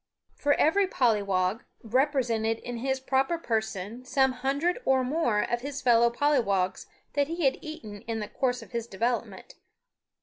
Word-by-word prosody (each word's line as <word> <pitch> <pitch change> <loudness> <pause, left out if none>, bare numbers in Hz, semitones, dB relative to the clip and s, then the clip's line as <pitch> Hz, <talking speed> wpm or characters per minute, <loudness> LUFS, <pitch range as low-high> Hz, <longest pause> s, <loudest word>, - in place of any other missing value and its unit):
For 285 0 +1
every 390 +5 +3
pollywog 205 - +1 0.2
represented 235 -3 +1
in 240 +1 -6
his 265 +2 -1
proper 270 +5 +1
person 220 - -3
some 265 +1 +2
hundred 280 - -1
or 265 -1 +3
more 250 -6 +1
of 240 0 -2
his 280 +1 -5
fellow 235 -1 +5
pollywogs 230 -9 +1 0.3
that 285 -1 +1
he 335 0 -2
had 270 - +2
eaten 215 -10 -8
in 225 -1 -2
the 210 - -4
course 250 -2 -1
of - - -16
his 235 -1 -3
development. 235 +4 -3
245 Hz, 155 wpm, -28 LUFS, 225-275 Hz, 0.3 s, fellow